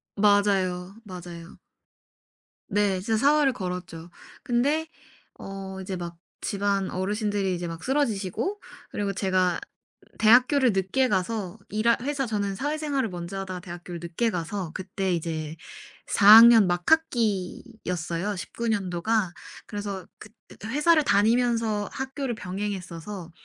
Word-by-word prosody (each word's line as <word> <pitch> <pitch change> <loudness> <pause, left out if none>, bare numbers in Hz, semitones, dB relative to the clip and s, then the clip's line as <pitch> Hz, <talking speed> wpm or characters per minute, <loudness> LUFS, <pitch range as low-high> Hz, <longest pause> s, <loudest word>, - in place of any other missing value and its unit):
맞아요. 195 -2 +2
맞아요. 175 -3 -10 1.1
네 200 -2 +2
진짜 220 +2 0
사활을 285 +2 +4
걸었죠. 180 -4 -6 0.3
근데 285 +5 +1 0.5
어 195 -1 -7
이제 190 0 -4
막 170 -1 -6 0.2
집안 200 -1 -1
어르신들이 205 0 -1
이제 175 0 -4
막 165 -1 -7
쓰러지시고 265 - -1 0.3
그리고 205 -1 -2
제가 185 -3 +1 0.6
대학교를 250 +3 +5
늦게 195 +8 +1
가서 200 0 -1
일할 220 +3 +2
회사 275 -1 -2
저는 205 -2 -2
사회생활을 290 -1 -1
먼저 175 +2 -6
하다가 185 -2 -5
대학교를 175 -1 -8
늦게 175 +7 0
가서 180 -1 -4
그때 190 0 -2
이제 160 -2 -3 0.5
4 200 - +2
학년 230 -3 +8
막 175 0 0
학기였어요 205 - -1
19 235 +5 -5
년도가. 190 -1 0 0.3
그래서 200 -3 -5
긋 215 - -12 0.3
회사를 300 +6 +3
다니면서 225 -1 +2
학교를 265 -2 -3
병행했어서 185 -2 -5
200 Hz, 275 characters per minute, -26 LUFS, 180-230 Hz, 1.1 s, 학년